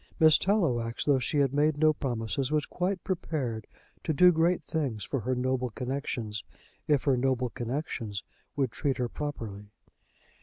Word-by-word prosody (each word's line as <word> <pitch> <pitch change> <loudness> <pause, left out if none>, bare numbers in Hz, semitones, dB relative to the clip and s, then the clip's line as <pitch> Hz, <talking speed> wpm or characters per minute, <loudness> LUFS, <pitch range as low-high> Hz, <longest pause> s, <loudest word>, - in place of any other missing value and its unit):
Miss 155 -2 +7
Tallowax, 130 - +1
though 140 -3 +4
she 140 +4 -1
had 140 -2 +3
made 145 +1 +2
no 155 0 +5
promises, 130 0 -2
was 150 -1 +2
quite 185 +1 -2
prepared 135 - -2 0.4
to 160 - 0
do 180 +5 +7
great 170 +2 +2
things 135 -10 -2
for 135 - -2
her 125 +3 -1
noble 130 0 0
connexions, 120 -3 -3 0.4
if 145 -3 +3
her 140 -3 +3
noble 125 -1 0
connexions 120 -5 -4 0.3
would 135 -4 0
treat 135 -1 -1
her 125 -2 0
properly. 110 -10 -5
135 Hz, 155 wpm, -29 LUFS, 120-155 Hz, 0.4 s, Miss